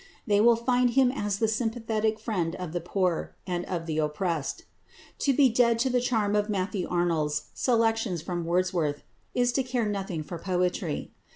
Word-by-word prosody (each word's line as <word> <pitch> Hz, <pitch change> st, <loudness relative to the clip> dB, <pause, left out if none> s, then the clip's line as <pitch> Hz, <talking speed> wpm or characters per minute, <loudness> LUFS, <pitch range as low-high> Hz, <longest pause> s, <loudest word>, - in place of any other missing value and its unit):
They 205 Hz, -3 st, +3 dB
will 235 Hz, +1 st, +6 dB
find 245 Hz, +1 st, +2 dB
him 255 Hz, +1 st, +4 dB
as 205 Hz, -6 st, -2 dB
the 220 Hz, -, +2 dB
sympathetic 220 Hz, -1 st, -1 dB
friend 175 Hz, -7 st, -2 dB
of 180 Hz, -3 st, -5 dB
the 175 Hz, -, -2 dB
poor 180 Hz, 0 st, -1 dB
and 180 Hz, -1 st, -2 dB
of 170 Hz, -3 st, -3 dB
the 160 Hz, -1 st, -2 dB
oppressed. 155 Hz, 0 st, -2 dB, 0.6 s
To 280 Hz, -, +2 dB
be 275 Hz, 0 st, +5 dB
dead 235 Hz, -1 st, +3 dB
to 255 Hz, +3 st, +1 dB
the 250 Hz, 0 st, +2 dB
charm 220 Hz, -4 st, +1 dB
of 210 Hz, +1 st, +1 dB
Matthew 190 Hz, -1 st, -1 dB
Arnold's 155 Hz, -4 st, 0 dB
"Selections 225 Hz, -6 st, +1 dB
from 175 Hz, 0 st, -3 dB
Wordsworth" 170 Hz, -4 st, 0 dB, 0.3 s
is 245 Hz, 0 st, +3 dB
to 270 Hz, -, +1 dB
care 250 Hz, -2 st, -1 dB
nothing 195 Hz, -6 st, -3 dB
for 170 Hz, +2 st, -7 dB
poetry. 180 Hz, -3 st, -1 dB
205 Hz, 175 wpm, -27 LUFS, 175-230 Hz, 0.6 s, will